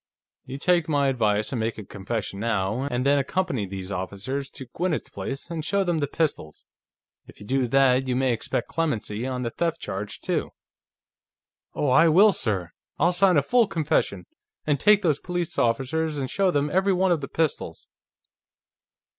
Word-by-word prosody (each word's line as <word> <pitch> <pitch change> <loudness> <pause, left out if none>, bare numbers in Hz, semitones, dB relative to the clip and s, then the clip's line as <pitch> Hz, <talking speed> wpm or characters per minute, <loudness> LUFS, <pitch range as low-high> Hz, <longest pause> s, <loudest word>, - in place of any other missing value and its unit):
You 135 - -6
take 170 +1 +2
my 140 -2 +2
advice 110 -4 0
and 125 - -1
make 110 +1 -2
a 105 - -8
confession 100 0 -5
now, 110 +3 -1
and 125 0 -1
then 140 +1 +4
accompany 140 - -1
these 95 0 -7
officers 100 +9 -4
to 130 - -9
Gwinnett's 175 -3 -2
place 135 +5 -6
and 160 -2 -3
show 200 +4 +1
them 175 -3 0
the 145 - 0
pistols. 140 - -3 0.6
If - - -15
you 105 - -11
do 130 +2 0
that, 130 0 +3
you 125 - 0
may 130 -1 +2
expect 115 +1 -3
clemency 125 -7 -2
on 125 -1 -3
the 115 - -2
theft 170 +4 -1
charge, 100 +2 -5
too." - - -2 1.2
"Oh, 145 - 0
I 155 +6 +6
will, 195 +7 +6
sir! 100 - -1 0.3
I'll 175 +4 +3
sign 185 -2 +4
a 140 - +3
full 240 - +3
confession, 150 - -1 0.4
and 145 -2 +1
take 210 -1 +5
these 155 -5 +2
police 175 -2 -3
officers 145 +7 0
and 135 -2 -2
show 195 -1 +2
them 145 -3 0
every 190 +3 +2
one 185 0 +2
of 165 -4 +1
the 135 - -4
pistols...." 160 -3 -2
135 Hz, 180 wpm, -25 LUFS, 115-165 Hz, 1.2 s, I